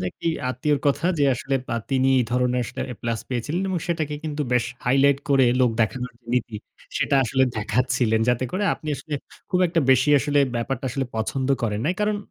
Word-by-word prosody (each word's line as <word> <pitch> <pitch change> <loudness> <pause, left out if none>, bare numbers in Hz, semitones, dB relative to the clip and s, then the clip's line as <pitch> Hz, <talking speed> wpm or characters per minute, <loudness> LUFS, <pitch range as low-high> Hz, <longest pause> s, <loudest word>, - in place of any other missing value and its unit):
যে - - -3
একটি 170 - -4 0.2
আত্মীয়র 140 +3 0
কথা 145 +4 +1
যে, 145 - +4
আসলে 135 +3 -3 0.2
আ - - 0
তিনি 130 0 +2
এই 125 - +2
ধরনের 125 0 +1
আসলে - - -7
এ - - -7
প্লাস 115 -1 -1
পেয়েছিলেন 145 +9 -2
এবং 185 -2 0
সেটাকে 155 -4 -1
কিন্তু 150 -1 -2
বেশ 125 -1 +3 0.2
হাইলাইট 135 +2 +4
করে 135 -2 +5 0.2
লোক 125 -2 +4
দেখানোর 125 +4 -1 0.2
নীতি 115 -3 -1 0.4
সেটা - - +1
আসলে 130 +3 +2
দেখাচ্ছিলেন। 115 +1 +1
যাতে 125 +1 +2
করে 200 +3 0
আপনি 155 - -9
আসলে 155 - -6 0.4
খুব 180 - +2
একটা 165 0 +1
বেশি 130 +2 +4
আসলে 145 +1 +1 0.2
ব্যাপারটা 130 +3 -3
আসলে 135 +1 -2
পছন্দ 130 +4 -1
করেন 105 -2 -1
নাই। 180 - +1
কারণ 210 0 +1
130 Hz, 195 wpm, -23 LUFS, 125-150 Hz, 0.4 s, করে